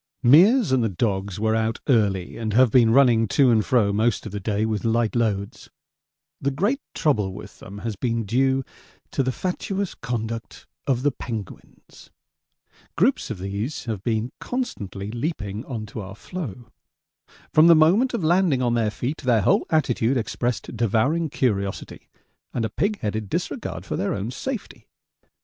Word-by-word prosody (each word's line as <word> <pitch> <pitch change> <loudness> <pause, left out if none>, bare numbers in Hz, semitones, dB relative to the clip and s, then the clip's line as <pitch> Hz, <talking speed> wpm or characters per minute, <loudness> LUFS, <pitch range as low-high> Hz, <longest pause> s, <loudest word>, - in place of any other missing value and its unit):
Meares 190 - +6
and 130 -2 +3
the 115 - +1
dogs 95 0 -2
were 110 +1 +1
out 110 0 0
early, 100 -8 +1
and 110 -2 -3
have 125 0 +5
been 120 -2 +5
running 115 -3 +5
to 130 +4 +4
and 110 -2 +3
fro 105 -5 +2
most 110 +1 +1
of 110 - -6
the 105 - -4
day 105 +2 -1
with 110 -3 -2
light 115 0 +1
loads. 105 -4 -2 0.7
The 140 - +1
great 200 - 0
trouble 105 -11 +1
with 100 0 -11
them 100 +1 -10
has 110 -2 -2
been 115 +1 -1
due 130 +5 +1 0.5
to - - 0
the 130 0 0
fatuous 190 +5 -3
conduct 115 -1 -5 0.2
of 130 -2 +1
the 145 - +3
penguins. 115 -5 -9 0.9
Groups 235 +11 +2
of 110 - -4
these 100 +10 -4
have 110 -5 -3
been 115 +2 -1
constantly 105 - -4
leaping 115 - -4
on 115 -5 -5
to 110 +1 -7
our 95 0 -8
floe. 120 - -7 0.8
From 155 +2 +7
the 170 - +8
moment 195 +12 +4
of 195 - -3
landing 165 -5 +3
on 120 -1 +1
their 115 -2 +1
feet 125 +9 -3
their 120 -5 +2
whole - - +2
attitude 130 -5 +1
expressed 120 +1 -2
devouring 120 - +1
curiosity 100 -8 -2 0.5
and 115 - 0
a - - -2
pig 205 - -1
headed 105 -1 -3
disregard - - -4
for - - -3
their - - -1
own 100 +4 -4
safety. 250 - -6
115 Hz, 165 wpm, -23 LUFS, 105-140 Hz, 0.9 s, the